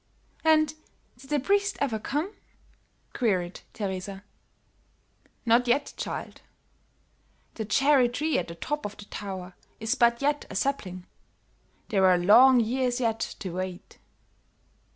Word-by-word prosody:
"And 310 -1 +4 0.4
did 265 +2 -16
the 295 -1 +2
priest 400 +7 +1
ever 240 -6 0
come?" 305 - -2 0.8
queried 185 -7 -1
Teresa. 195 -1 -5 1.2
"Not 240 +2 +4
yet, 280 +4 +1
child; - - -6 1.1
the 220 - -4
cherry 270 +2 +4
tree 300 +6 0
at 175 - -4
the 170 - -8
top 295 - -3
of 205 0 -6
the 205 - -10
tower 190 -3 -7 0.3
is 220 +2 0
but 235 -3 +3
yet 290 +1 0
a - - -8
sapling; 185 -10 -2 0.8
there 190 -3 +4
are 180 -1 +5
long 240 +8 +7
years 245 +2 0
yet 225 -3 0 0.2
to 185 - -4
wait." 185 0 -6
235 Hz, 130 wpm, -27 LUFS, 195-275 Hz, 1.2 s, long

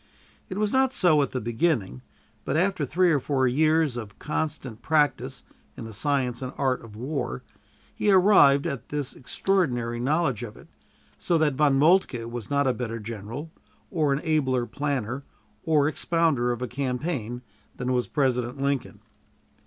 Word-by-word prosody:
It 185 - -5
was 210 0 0
not 265 0 +3
so 165 - +4
at 140 - 0
the 130 - -3
beginning; 115 - -1 0.4
but 140 - -1
after 185 -3 +1
three 180 +5 +3
or 145 - +3
four 130 -1 +1
years 155 +1 +2
of 110 -4 -7
constant 150 -6 -4
practice 150 +1 +1 0.3
in - - -6
the 110 - -8
science 130 +2 0
and 130 -1 -4
art 130 -3 0
of 110 -2 -12
war, 125 - -4 0.5
he 210 - 0
arrived 185 -8 +6
at 140 -7 -4
this 145 -2 -3
extraordinary 125 -7 -1
knowledge 135 -2 0
of 115 -3 -7
it, - - -16 0.5
so 170 - +1
that 155 -3 +2
Von 140 0 +3
Moltke 150 -6 +3
was 115 -2 -6
not 140 0 +2
a 130 - +2
better 115 -1 -4
general, 115 +8 -7 0.4
or 155 -5 +1
an 140 +2 0
abler 135 -7 +1
planner 135 0 -3 0.4
or 150 -3 +3
expounder 155 -6 +1
of 120 +1 -3
a - - -2
campaign, 125 -2 -3 0.3
than 125 +1 -1
was 125 -1 0
President 125 -3 0
Lincoln. 135 -6 -2
140 Hz, 160 wpm, -26 LUFS, 120-155 Hz, 0.5 s, arrived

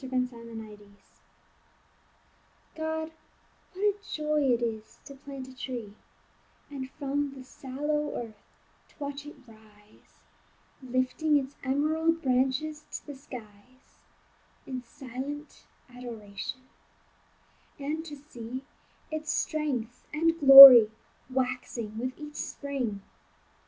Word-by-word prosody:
GO 265 - -7
PLANT 255 -1 -1
A 225 -2 -10
TREE 205 -1 -19 1.9
God, 315 0 -3 0.6
what 385 - -5
a 415 -1 +4 0.2
joy 300 0 0
it 240 0 +1
is 220 -2 -5
to 280 - -10
plant 275 -1 -9
a 260 - -13
tree, 245 -6 -6 0.8
And 265 -2 -6
from 285 0 -3
the 260 - -10
sallow 295 +3 -4
earth 220 -3 -7 0.5
to - - -26
watch 285 0 -6
it 300 - -10
rise, 215 -2 -22 0.6
Lifting 255 +4 0
its 275 0 -4
emerald 315 +5 0
branches 270 +4 0
to - - -7
the 290 - -8
skies 250 -2 -14 0.7
In 255 -2 -5
silent 270 +4 -8 0.2
adoration; 235 -2 -8 1.2
and 300 +3 -4
to 300 -3 -8
see 260 -3 -9 0.5
Its 310 0 -3
strength 270 -8 -2
and 330 +2 +1
glory 270 -5 +12 0.4
waxing 250 -4 -3
with 255 +2 -3
each 300 0 -10
spring. 250 -8 -4
265 Hz, 110 wpm, -28 LUFS, 240-295 Hz, 1.9 s, glory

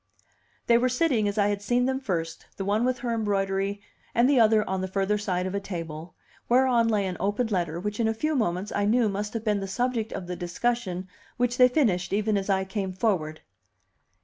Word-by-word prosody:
They 235 0 +5
were 255 +1 +2
sitting 250 -5 +1
as 205 +1 -3
I 205 -1 +3
had 205 -1 -2
seen 245 +4 +1
them 265 0 0
first, 165 -9 -4
the 195 - -3
one 210 +3 +1
with 255 0 +1
her 235 - 0
embroidery, 200 -2 -1 0.3
and 235 +2 +5
the 275 -2 +4
other 220 -2 +4
on 190 0 -1
the 190 - -2
further 195 +2 0
side 185 -3 -1
of 185 - -3
a 200 - 0
table, 165 -4 -7 0.3
whereon 245 -2 +4
lay 210 -3 +1
an 185 -1 -3
open 205 +5 0
letter, 175 -6 -1
which 210 +3 -4
in 225 - +2
a 225 - +1
few 305 +7 -1
moments 190 -4 -1
I 205 - 0
knew 225 +1 +3
must 205 +2 -4
have 225 - -2
been 210 -2 +1
the 195 - -4
subject 235 +1 -1
of 180 - -5
the 180 0 -5
discussion 185 +1 -2 0.3
which 245 0 0
they 250 - +8
finished 215 - +1
even 210 +1 +1
as 195 0 -2
I 190 -1 +2
came 190 -1 -3
forward. 180 -6 -1
205 Hz, 220 wpm, -26 LUFS, 190-235 Hz, 0.3 s, they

